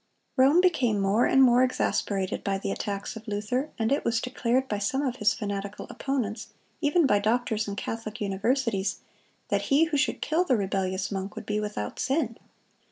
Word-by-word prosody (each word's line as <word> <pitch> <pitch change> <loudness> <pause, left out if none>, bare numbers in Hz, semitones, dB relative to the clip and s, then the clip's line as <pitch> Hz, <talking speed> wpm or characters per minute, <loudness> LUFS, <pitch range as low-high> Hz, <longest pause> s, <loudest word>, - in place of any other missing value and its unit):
Rome 275 +7 +5
became 255 - +2
more 200 +4 +3
and 270 - +5
more 245 -1 +6
exasperated 200 -6 -1
by 195 -1 0
the 195 - -3
attacks 200 +1 -4
of 225 +1 -10
Luther, 215 +7 -2
and 225 +1 0
it 280 - +2
was 230 0 +1
declared 250 +1 0
by 210 -4 -2
some 265 +8 0
of 260 -2 -2
his 210 0 +2
fanatical 200 -2 -4
opponents, 230 -5 -3 0.3
even 310 +2 +3
by 205 -6 +4
doctors 220 0 0
in 200 - -4
Catholic 220 0 -5
universities, 205 +1 0 0.5
that - - +1
he 285 +3 +5
who 325 -2 0
should 280 - 0
kill 320 +3 +1
the 260 -9 +2
rebellious 190 -1 -1
monk 195 0 -4
would - - -7
be 210 0 -1
without 205 - -4
sin. 265 -4 0
225 Hz, 180 wpm, -27 LUFS, 200-265 Hz, 0.5 s, more